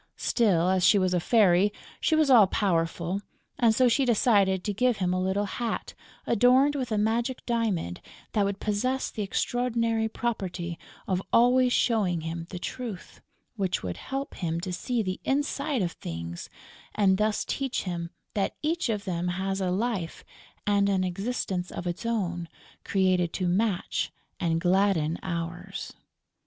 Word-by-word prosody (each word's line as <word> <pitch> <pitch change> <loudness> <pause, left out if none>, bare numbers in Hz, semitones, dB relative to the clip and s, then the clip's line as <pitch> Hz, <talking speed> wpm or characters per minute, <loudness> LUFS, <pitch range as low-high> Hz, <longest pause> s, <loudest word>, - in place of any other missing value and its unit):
Still, 190 -8 +2
as 185 -1 +2
she 205 - +6
was 185 -2 +2
a 180 - +3
fairy, 195 0 +4 0.3
she 320 - +2
was 310 -3 +3
all 220 -6 +8
powerful; 175 -1 0 0.4
and 230 -2 +4
so 255 +1 +5
she 245 +4 +3
decided 205 -6 +3
to 205 - -1
give 245 +2 +2
him 180 -2 0
a 185 - 0
little 190 +2 0
hat 230 +3 -3 0.3
adorned 255 +5 +4
with 255 -4 -3
a 215 - +1
magic 230 +4 0
diamond 215 - -1 0.3
that 210 - +2
would 200 0 -1
possess 255 +6 -1
the 215 - -4
extraordinary 230 +1 0
property 185 -8 -3 0.3
of 185 -1 0
always 250 +1 +5
showing 200 -10 +2
him 165 +1 -5
the 180 - -6
truth, 220 +1 -6 0.4
which 190 -2 -1
would 90 -2 -4
help 270 +1 -5
him 165 -2 -2
to 180 0 -4
see 235 +5 -1
the 185 -1 -4
inside 280 -2 0
of 175 - -1
Things 85 - -7 0.5
and 195 -2 +3
thus 215 -1 +1
teach 270 -2 -2
him 170 -2 -4 0.2
that 200 -2 -1
each 320 -3 0
of 210 -2 -1
them 175 -2 -2
has 190 +2 -2
a 185 - 0
life 195 -3 -2 0.4
and 200 -1 +3
an 190 -2 +2
existence 185 -1 -2
of 175 - -6
its 175 +6 -3
own, 175 -7 -2 0.3
created 185 -3 +1
to 185 - -1
match 190 +1 0 0.3
and 165 -2 +1
gladden 180 -3 +2
ours. 170 -1 -5
200 Hz, 160 wpm, -27 LUFS, 180-235 Hz, 0.5 s, all